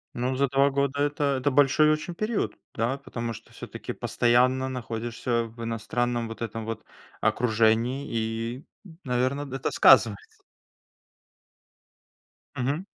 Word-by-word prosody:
Ну, 125 +2 -1
за 140 +1 +2
2 140 +2 +3
года 140 0 0
это 145 +1 0 0.2
это 140 +2 +1
большой 145 +2 +5
очень 155 +3 -2
период, 215 +2 -1 0.2
да. 120 +5 -1
Потому 115 -4 -5
что - - -13
всё-таки - - -7
постоянно 130 +2 +2
находишься 120 -1 -2
в 115 +1 -9
иностранном 115 +1 -1
вот 115 +1 -9
этом 115 -1 -4
вот 115 -1 -5 0.4
окружении, 115 +3 +2
и, 115 +3 -3 0.4
наверно, 130 +3 0
д 135 -1 -7
это 135 - -2
сказывается. 110 -5 +4 2.1
Мгм. 140 +9 -1
125 Hz, 125 wpm, -26 LUFS, 115-140 Hz, 2.1 s, большой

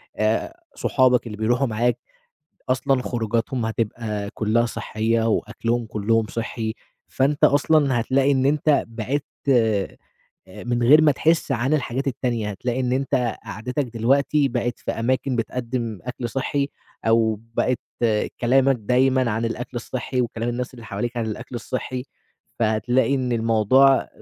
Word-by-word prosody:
آآ 110 - -1 0.2
صحابك 125 -2 +2
اللي 105 -2 -7
بيروحوا 120 +5 +1
معاك، 120 +2 +1 0.7
أصلًا 130 0 +1
خروجاتهم 115 0 -1
هتبقى 110 -2 -3
كلّها 115 +2 +1
صحّية 115 0 -1
وأكلهم 115 +1 -1
كلّهم 110 0 0
صحّي، 110 0 -4 0.3
فأنت 140 +2 +1
أصلًا 145 -3 +3
هتلاقي 135 +4 +2
إن 130 -1 +2
أنت 150 0 +2
بعِدت 125 +6 -3 0.2
آآ 110 -6 +2 0.5
من 120 +6 -3
غير 150 +6 +7
ما 150 -2 +5
تحس 160 +1 +1
عن 130 +4 +1
الحاجات 135 -1 -2
التانية، 120 -4 -1
هتلاقي 120 +6 -3
إن 125 -1 0
أنت 130 -3 0
قعدتك 125 +6 -3
دلوقتي 140 +5 +2
بقِت 120 -2 -2
في - - -4
أماكن 130 +2 -1
بتقدّم 115 -2 -3
أكل 125 0 -5
صحّي، 140 +3 -1 0.4
أو 110 -2 +3
بقِيت 125 +1 +1 0.6
كلامك 135 +2 +3
دايمًا 125 +2 +2
عن 110 +2 -1
الأكل 120 +2 -4
الصحّي 125 +2 -3
وكلام 115 -1 -2
الناس 125 +2 -3
اللي 115 - -11
حواليك 115 +4 -4
عن 115 -2 -1
الأكل 110 +3 -6
الصحّي، 125 +1 -4 0.6
فهتلاقي 120 +5 +2
إن 130 -2 -1
الموضوع 115 +4 +4
120 Hz, 135 wpm, -23 LUFS, 115-130 Hz, 0.7 s, غير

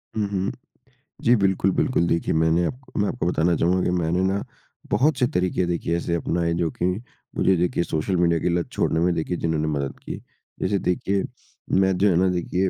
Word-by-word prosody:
हुँ, 105 -2 0
हुँ। 95 -1 -1 0.7
जी, 120 +1 +5
बिल्कुल, 95 -2 +2
बिल्कुल। 90 -8 +1
देखिए 85 - 0
मैंने 80 +2 +2
आपको 130 0 -5
मैं 100 - +2
आपको 120 - -3
बताना 85 0 +2
चाहूँगा 90 +2 +2
कि - - +1
मैंने 85 +2 0
ना 95 +1 0 0.5
बहुत 150 +4 +3
से 125 - +3
तरीके 90 0 +1
देखिए 85 -1 -1
ऐसे 85 0 -1
अपनाए 85 0 0
जो 85 -1 0
कि - - -3 0.5
मुझे 95 - +3
देखिए 85 0 +1
सोशल 85 +4 -1
मीडिया 85 -1 +3
के 90 - 0
लत 85 0 -1
छोड़ने 80 - 0
में 90 +1 +2
देखिए 85 +2 -2
जिन्होंने 80 -2 -1
मदद 70 -2 -3
की। - - -6 0.4
जैसे 100 +1 +1
देखिए 95 +2 0 0.6
मैं 95 -1 +3
जो 100 +1 +4
है 85 - +2
ना 95 +2 +3
देखिए 90 +1 0
90 Hz, 200 wpm, -23 LUFS, 85-95 Hz, 0.7 s, जी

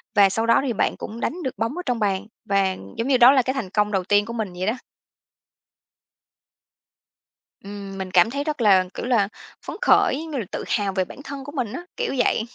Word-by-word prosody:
và 200 -1 +6
sau 225 +4 -1
đó 230 0 +4
thì 245 - 0
bạn - - 0
cũng 225 +2 -7
đánh 345 +7 -3
được 260 -5 -4
bóng 230 - -2
ở 360 - -2
trong 245 -2 -1
bàn, 200 -1 0 0.2
và 195 -1 +1 0.2
giống 230 - -1
như 270 -2 +4
đó 245 +2 +8
là 270 - +4
cái 260 +2 -2
thành 245 -9 -4
công 210 +2 +1
đầu 190 -3 0
tiên 205 +2 +3
của 230 - -6
mình 215 -6 -3
vậy 180 +1 -4
đó. 220 - +2 2.9
Ừm, 200 -1 -8
mình 190 -1 -5
cảm 180 +3 +5
thấy 280 +4 -3
rất 300 -4 -3
là, 195 -4 +5
kiểu - - -5
là, 235 -6 +2 0.4
phấn - - -5
khởi, 265 - +4
giống 320 -1 -8
như 280 - -3
là 225 - -3
tự - - -4
hào 200 -3 0
về 185 -1 0
bản 265 - -11
thân 280 -1 -7
của 285 - -8
mình 255 -8 -3
á, 345 - -5 0.2
kiểu 485 - -1
vậy. 245 -2 +2
225 Hz, 235 wpm, -23 LUFS, 195-260 Hz, 2.9 s, đó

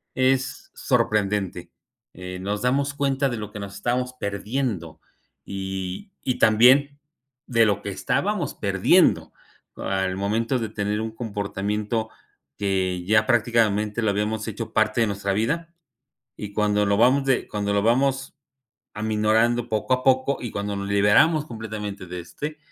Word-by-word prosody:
es 130 0 0
sorprendente, 100 -4 0 0.4
eh, 90 0 -7
nos 105 +2 -2
damos 140 +3 +1
cuenta 140 -1 0
de 120 - -3
lo 105 -1 -6
que 105 - -8
nos 100 -1 -7
estábamos 125 +4 -1
perdiendo 100 - -3 0.5
y 95 - -5
y 130 - -1
también 130 +6 +5 0.5
de 115 -2 +4
lo 100 -3 +1
que - - -4
estábamos - - -1
perdiendo - - +3 0.5
al 95 -1 -1
momento 115 +6 0
de 110 -2 -3
tener 105 0 -2
un 110 0 -3
comportamiento 105 0 -3 0.5
que 95 -3 -1
ya 110 +1 +4
prácticamente 110 -2 +2
lo 110 - +1
habíamos 105 +2 -1
hecho 110 +1 -5
parte 110 +1 +2
de 115 - +3
nuestra 100 -1 -2
vida, 165 +11 -1 0.6
y 105 -1 -7
cuando 105 0 +2
lo 100 - +2
vamos 130 +4 +4
de 135 -2 +1
cuando 100 -1 -2
lo 100 0 +2
vamos 135 +4 +1 0.6
aminorando 110 +2 +1
poco 110 +4 0
a 125 - 0
poco 130 +1 +2
y 120 - -4
cuando 100 0 -3
nos 100 0 -4
liberamos 105 +11 +4
completamente 105 -5 -6
de 90 +1 -6
este, 150 - -6
110 Hz, 145 wpm, -24 LUFS, 100-125 Hz, 0.6 s, también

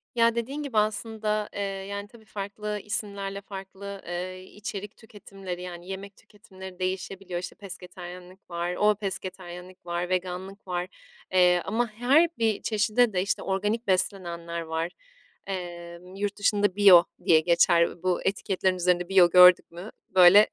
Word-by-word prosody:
Ya, 230 0 +4
dediğin 270 +6 -3
gibi 255 -6 -4
aslında, 215 0 0
eee, 205 - -6
yani, 200 +1 -4
tabii 220 0 -18
farklı 210 +1 -5
isimlerle 200 -1 -3
farklı, 195 0 -8
eee, 185 +1 -5
içerik 205 +1 -7
tüketimleri, 195 -5 -9
yani, 175 0 -8
yemek 195 +1 -7
tüketimleri 190 -3 -13
değişebiliyor. 185 -1 -3
İşte, 180 - -7
pesketaryenlik 180 -1 -10
var, 175 +1 -2
o 210 0 +3
pesketaryenlik 185 -2 -7
var, 175 +1 -2
veganlık 185 +2 -4
var, 180 0 -2 0.4
eee, 180 -1 +4
ama 230 +4 0
her 250 +10 +3
bir 225 -3 +1
çeşide 220 +1 +2
de 180 - +1
işte, 200 - -1
organik 210 +4 -1
beslenenler 170 -3 -1
var. 160 +1 -3 0.6
Eee, 175 -2 -6 0.2
yurt 205 +1 -3
dışında 205 -2 +2
bio 190 -4 +8 0.2
diye 160 -2 +6
geçer 170 +1 +3
bu 185 -1 0
etiketlerin 190 -1 0
üzerinde. 180 0 +1
Bio 185 -3 +6
gördük 180 -1 +7
mü, 175 +6 -9 0.2
böyle, 185 +3 +8
190 Hz, 140 wpm, -27 LUFS, 180-205 Hz, 0.6 s, bio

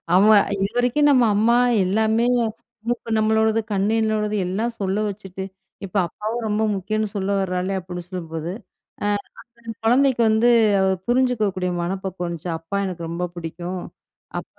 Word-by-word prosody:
ஆமா, 210 +3 +7 0.3
"இதுவரைக்கும் 245 +7 +2
நம்ம 260 -3 +5
அம்மா 225 +3 +4 0.3
எல்லாமே, 220 +4 +2 0.6
மூக்கு 235 -1 -2
நம்மளோடது, 220 +1 +2
கண்ணு 200 +2 +1
என்னோடது, 215 -1 0
எல்லாம் 220 +6 -1
சொல்ல 195 0 -1
வச்சுட்டு, 190 -2 -6 0.4
இப்ப 185 - -12
அப்பாவும் 220 +7 -4
ரொம்ப 215 +1 0
முக்கியம்ன்னு 215 +3 -2
சொல்லவறாளே." 190 -1 -1
அப்படின்னு 180 -1 -7
சொல்லும்போது, 165 -2 -5 0.5
அ - - 0 0.6
அந்த 230 -1 -6
குழந்தைக்கு 255 +2 +3
வந்து 220 +2 +3 0.6
புரிஞ்சுக்கக்கூடிய 220 -7 +1
மனப்பக்குவம் 185 0 -3
வந்துச்சா? 170 0 -5
அப்பா 165 +5 -4
எனக்கு 180 -3 -5
ரொம்ப 170 +2 -4
புடிக்கும். 175 +2 -5 0.6
அப்பா - - -20
205 Hz, 130 wpm, -22 LUFS, 185-220 Hz, 0.6 s, ஆமா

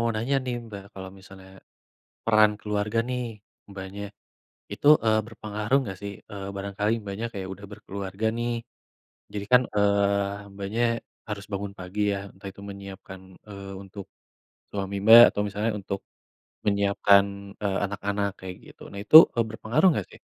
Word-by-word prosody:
nanya 120 +6 0
nih, 125 -1 -3
Mbak. 100 -3 -8
Kalau 95 -1 -8
misalnya 95 0 -14 0.8
peran 110 -1 +5
keluarga 105 +1 -1
nih, 125 0 -2 0.5
Mbaknya. 100 +1 -7 0.7
Itu, 145 - -1 0.2
eee, 110 -1 +4
berpengaruh 110 +2 -1
nggak 95 -6 -6
sih? 100 0 -5 0.2
Eee, 100 -1 -6
barangkali 100 +2 -2
Mbaknya 105 +2 -5
kayak 95 -2 -5
udah 100 +1 -11
berkeluarga, 100 +1 -6
nih. 120 0 -1 0.8
Jadi 100 -1 -4
kan, 125 0 +8
eee, 100 0 +1
Mbaknya 100 +4 -2 0.5
harus 100 -2 -5
bangun 100 0 -3
pagi 90 +3 -6
ya, 100 - -2
entah 95 +1 -10
itu 100 - -14
menyiapkan, 100 -1 -10 0.3
eee, 100 -1 -8
untuk 100 0 -10 0.7
suami 100 -1 -3
Mbak, 115 +2 +11
atau 105 - -2
misalnya 105 +3 -1
untuk 100 0 -4 0.7
menyiapkan, 100 0 +4 0.4
eee, 100 -1 0
anak-anak, 100 0 -2
kayak 95 -1 -7
gitu. - - -15
Nah 100 - -7
itu, 155 - +8 0.2
eee, 115 - +1
berpengaruh 110 - +2
nggak, - - -2
sih? - - -14
100 Hz, 150 wpm, -26 LUFS, 100-105 Hz, 0.8 s, Mbak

